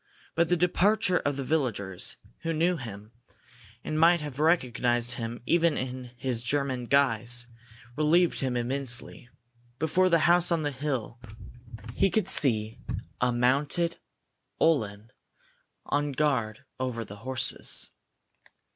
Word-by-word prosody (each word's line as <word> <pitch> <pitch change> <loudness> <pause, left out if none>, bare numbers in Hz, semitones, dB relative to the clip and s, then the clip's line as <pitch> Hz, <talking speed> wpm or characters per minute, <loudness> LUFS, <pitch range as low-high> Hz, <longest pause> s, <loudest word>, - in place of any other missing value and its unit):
But 170 0 +1
the 175 - +3
departure 185 +3 +3
of 145 -1 -1
the 135 - -2
villagers, 115 - -2 0.2
who 165 0 -2
knew 170 +3 +1
him, 105 -4 -9 0.7
and 155 - -2
might 170 +2 +5
have 145 -3 -7
recognized 125 -6 +1
him 120 -1 -5
even 170 0 +2
in 130 -1 -5
his 125 -2 -1
German 130 -1 -1
guise, 120 -3 +2 0.5
relieved 160 +4 +3
him 130 -2 -1
immensely. 125 -1 -3 0.5
Before 180 +5 +2
the 170 - +5
house 175 0 +5
on 165 -2 +1
the 145 - -1
hill 130 -4 -4 0.7
he 195 - +2
could 205 -1 0
see 110 - +3 0.4
a 125 0 +3
mounted 140 +8 +1 0.6
Uhlan 110 -9 +1 0.7
on 145 0 -1
guard 130 -4 -1
over 125 -3 -3
the 105 0 -10
horses. 130 +4 -1
135 Hz, 125 wpm, -28 LUFS, 120-165 Hz, 0.7 s, might